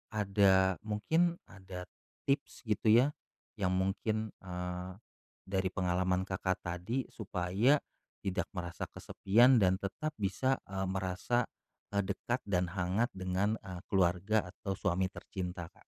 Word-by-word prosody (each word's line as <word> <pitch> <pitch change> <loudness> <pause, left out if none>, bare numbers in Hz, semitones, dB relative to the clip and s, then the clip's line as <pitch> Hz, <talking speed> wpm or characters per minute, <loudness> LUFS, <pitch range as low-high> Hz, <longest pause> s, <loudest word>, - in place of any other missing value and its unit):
ada 95 -2 +4
mungkin, 160 +12 +1
ada 95 -2 -9 0.4
tips 140 +1 -1
gitu 110 -2 0
ya, 120 +6 +6 0.5
yang 95 -2 +2
mungkin, 105 +3 0
eee, 90 0 -4 0.5
dari 95 0 0
pengalaman 90 0 +1
Kakak 95 -1 -2
tadi 90 +10 -2
supaya 100 +6 +2 0.5
tidak 95 -2 -1
merasa 85 -1 -4
kesepian 120 +5 +4
dan 95 -2 +4
tetap 150 +11 -4
bisa, 105 +6 +1 0.2
eee, 95 0 -1
merasa, 95 +6 0 0.5
e 100 - +1
dekat 100 +5 -1
dan 90 -3 +1
hangat 95 +7 0
dengan, 95 +3 0
e 95 - -9 0.2
keluarga 95 +2 +2
atau 95 - -5
suami 95 -1 0
tercinta, 90 -4 -5
Kak. - - -23
95 Hz, 125 wpm, -33 LUFS, 90-110 Hz, 0.5 s, ya